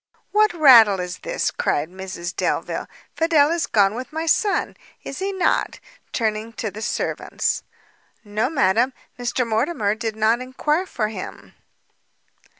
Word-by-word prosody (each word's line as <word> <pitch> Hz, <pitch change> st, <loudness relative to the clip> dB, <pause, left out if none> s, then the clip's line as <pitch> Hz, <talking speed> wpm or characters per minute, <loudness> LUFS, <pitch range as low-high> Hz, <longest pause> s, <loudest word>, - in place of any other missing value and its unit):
"What 425 Hz, 0 st, +4 dB
rattle 235 Hz, -, +7 dB
is 180 Hz, 0 st, -5 dB
this?" -, -, -2 dB
cried 145 Hz, +2 st, -1 dB
Mrs 185 Hz, -1 st, -7 dB
Delvile; -, -, -2 dB, 0.3 s
"Fidel 320 Hz, -2 st, +3 dB
is 335 Hz, -1 st, 0 dB
gone 200 Hz, -1 st, +3 dB
with 255 Hz, +5 st, -6 dB
my 320 Hz, +1 st, -3 dB
son, 400 Hz, +5 st, +1 dB, 0.3 s
is 275 Hz, -, -7 dB
he 390 Hz, +1 st, -1 dB
not?" 380 Hz, -2 st, 0 dB, 0.3 s
turning 220 Hz, 0 st, -2 dB
to 220 Hz, -2 st, -4 dB
the 215 Hz, -, -8 dB
servants. -, -, -2 dB, 0.6 s
"No, 210 Hz, +3 st, -1 dB
madam, 255 Hz, -3 st, +2 dB, 0.3 s
Mr 245 Hz, +1 st, -1 dB
Mortimer 220 Hz, -1 st, 0 dB
did 220 Hz, 0 st, -4 dB
not 220 Hz, +3 st, +2 dB
enquire 300 Hz, +7 st, -1 dB
for 215 Hz, -9 st, -2 dB
him." 220 Hz, -, -8 dB
235 Hz, 140 wpm, -22 LUFS, 215-310 Hz, 0.6 s, rattle